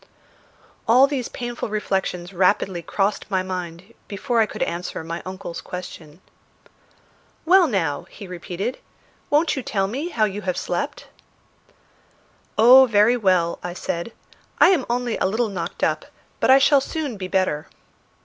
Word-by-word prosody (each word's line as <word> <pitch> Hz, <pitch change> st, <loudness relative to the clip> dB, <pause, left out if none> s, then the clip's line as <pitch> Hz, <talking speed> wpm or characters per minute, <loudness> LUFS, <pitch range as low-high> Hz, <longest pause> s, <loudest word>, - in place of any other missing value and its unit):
All 250 Hz, +4 st, +7 dB
these 275 Hz, -4 st, -3 dB
painful 240 Hz, -2 st, -5 dB
reflections 195 Hz, -3 st, -2 dB
rapidly 185 Hz, -1 st, +1 dB
crossed 200 Hz, +5 st, -1 dB
my 190 Hz, -2 st, 0 dB
mind 185 Hz, +2 st, -6 dB
before 230 Hz, +4 st, -1 dB
I 220 Hz, -, +2 dB
could -, -, -3 dB
answer 170 Hz, -1 st, -4 dB
my 165 Hz, +1 st, -5 dB
uncle's 185 Hz, -2 st, -6 dB
question. 175 Hz, -2 st, -9 dB, 1.2 s
"Well, 360 Hz, +1 st, +6 dB
now," 165 Hz, -, -1 dB
he 200 Hz, -, -11 dB
repeated, 180 Hz, +6 st, -5 dB, 0.5 s
"won't 305 Hz, +3 st, +2 dB
you 265 Hz, -, -3 dB
tell 195 Hz, -5 st, -1 dB
me 270 Hz, -, -4 dB
how 225 Hz, -10 st, +1 dB
you 205 Hz, 0 st, -4 dB
have 185 Hz, -3 st, -2 dB
slept?" -, -, -3 dB, 1.5 s
"Oh, 255 Hz, +4 st, +8 dB
very 215 Hz, +1 st, +4 dB
well," 185 Hz, -7 st, +1 dB
I 175 Hz, -, -5 dB
said. 170 Hz, +4 st, -4 dB, 0.5 s
"I -, -, +7 dB
am 345 Hz, -9 st, +2 dB
only 245 Hz, -1 st, -1 dB
a -, -, +2 dB
little 220 Hz, +3 st, 0 dB
knocked 175 Hz, -4 st, -5 dB
up, -, -, 0 dB, 0.3 s
but -, -, +1 dB
I 265 Hz, -, +9 dB
shall 275 Hz, 0 st, +5 dB
soon 290 Hz, -3 st, -4 dB
be 190 Hz, -2 st, -5 dB
better." 185 Hz, -6 st, 0 dB
200 Hz, 150 wpm, -22 LUFS, 180-245 Hz, 1.5 s, I